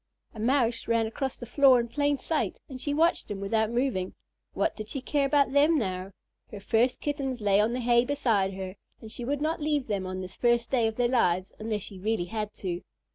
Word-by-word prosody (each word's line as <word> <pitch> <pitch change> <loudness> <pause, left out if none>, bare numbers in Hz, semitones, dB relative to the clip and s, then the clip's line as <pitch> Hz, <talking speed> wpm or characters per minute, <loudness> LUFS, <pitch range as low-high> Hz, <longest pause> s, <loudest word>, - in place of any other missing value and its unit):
A 220 - -10
Mouse 235 0 +1
ran 230 -1 +2
across 265 +4 -3
the 240 - -8
floor 260 +1 +5
in 235 - -1
plain 285 +4 0
sight, 315 +4 -2
and 260 -3 -8
she 290 - -2
watched 330 +4 +2
him 205 -2 -4
without 220 +2 0
moving. 235 -6 -1 0.4
What - - 0
did 215 -1 -7
she 275 - -3
care 280 +2 0
about 280 -1 +3
them 295 +4 +4
now? 185 -6 -2 0.4
Her 205 - -8
first 230 +5 +1
Kittens 275 -4 -2
lay 200 -2 +3
on 220 +3 +1
the 250 - -2
hay 240 0 +4
beside 225 -8 +1
her, 190 0 -6 0.2
and 220 - -10
she 240 - -6
would 285 +3 -2
not 315 +1 -1
leave 295 -3 0
them 195 -3 -2
on 185 0 -4
this 185 0 -7
first 240 -1 +1
day 240 -4 +3
of 220 - -3
their 245 0 +2
lives 185 -7 +1
unless 215 -2 -3
she 195 - -9
really 215 -2 -1
had 210 +2 -4
to. 180 -2 -4
235 Hz, 225 wpm, -28 LUFS, 205-275 Hz, 0.4 s, floor